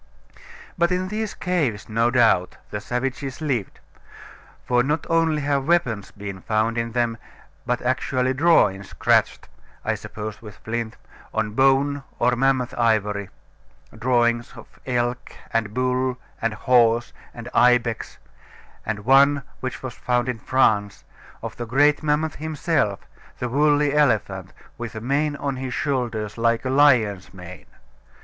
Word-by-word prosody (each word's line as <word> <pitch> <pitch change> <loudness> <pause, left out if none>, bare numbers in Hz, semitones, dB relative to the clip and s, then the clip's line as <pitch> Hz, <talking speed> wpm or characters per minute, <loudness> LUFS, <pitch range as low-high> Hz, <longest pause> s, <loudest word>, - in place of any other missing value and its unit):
But 170 +1 +3
in 185 +1 -1
these 215 0 -3
caves, 150 - -1
no 115 +2 +1
doubt, 115 -7 +3
the 105 - -4
savages 130 +4 -3
lived; 130 - -2 0.9
for 125 0 +3
not 150 +5 -1
only 165 -3 +2
have 140 -1 0
weapons 125 - +1
been 100 -2 -8
found 110 +3 0
in 115 -1 -2
them, 120 -2 0 0.5
but 125 0 -1
actually 130 0 0
drawings 130 - +3
scratched - - +1 0.4
(I - - +1
suppose 105 0 -7
with 105 -3 -11
flint) 115 0 -4 0.4
on 110 -1 0
bone 135 +4 +3 0.2
or 125 +1 +2
mammoth 130 -1 +1
ivory 105 -4 +1 0.7
drawings 120 0 +1
of - - -14
elk, 120 -1 -2 0.2
and 110 -2 0
bull, 130 +1 0 0.2
and 115 -1 -1
horse, 120 0 +3 0.2
and 120 0 -9
ibex 120 -2 +2 0.7
and 105 -1 -4
one, 140 +2 +5 0.2
which 130 0 -5
was 130 - -5
found 125 0 -1
in 125 -3 -3
France, 105 -5 +1 0.4
of - - -6
the 120 - -5
great 145 +5 +3
mammoth 155 0 0
himself, 150 - -1 0.4
the 125 - -3
woolly 145 +2 +3
elephant, 105 -10 +1 0.3
with 120 -1 -6
a - - -4
mane 145 +5 0
on 140 -2 -3
his 130 -1 -4
shoulders 120 -6 -2
like 115 +1 +1
a 130 - 0
lion's 120 -9 +3
mane. 90 0 -11
125 Hz, 140 wpm, -23 LUFS, 110-140 Hz, 0.9 s, one